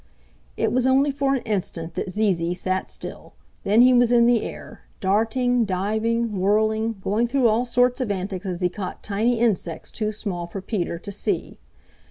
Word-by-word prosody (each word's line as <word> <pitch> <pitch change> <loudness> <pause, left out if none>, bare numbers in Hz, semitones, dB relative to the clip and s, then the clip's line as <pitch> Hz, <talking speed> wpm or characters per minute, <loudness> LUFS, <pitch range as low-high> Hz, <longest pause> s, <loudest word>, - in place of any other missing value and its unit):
It - - +1
was 255 +1 +2
only 270 +2 +3
for 275 0 +1
an 260 - -3
instant 180 -6 -3
that - - -3
Zee 210 +1 +2
Zee 170 +1 -2
sat 185 +1 -2
still; - - -9 0.3
then 210 +4 +4
he 255 +1 +7
was 245 -1 +4
in 235 -1 +5
the 240 -2 +4
air, - - -8 0.2
darting, 230 +5 +1
diving, 215 +2 -1
whirling, 220 +3 +1
going 220 +4 +1
through 255 0 +2
all 225 +3 +2
sorts 245 +1 +2
of 250 - -2
antics 195 0 -3
as 180 -1 -4
he 180 - +3
caught 185 0 -6
tiny 220 +4 0
insects 185 -8 -1
too 215 -2 -2
small 190 -5 -4
for 185 +3 -6
Peter 185 -4 -3
to 200 +4 -8
see. 200 - -3
215 Hz, 185 wpm, -23 LUFS, 190-240 Hz, 0.3 s, he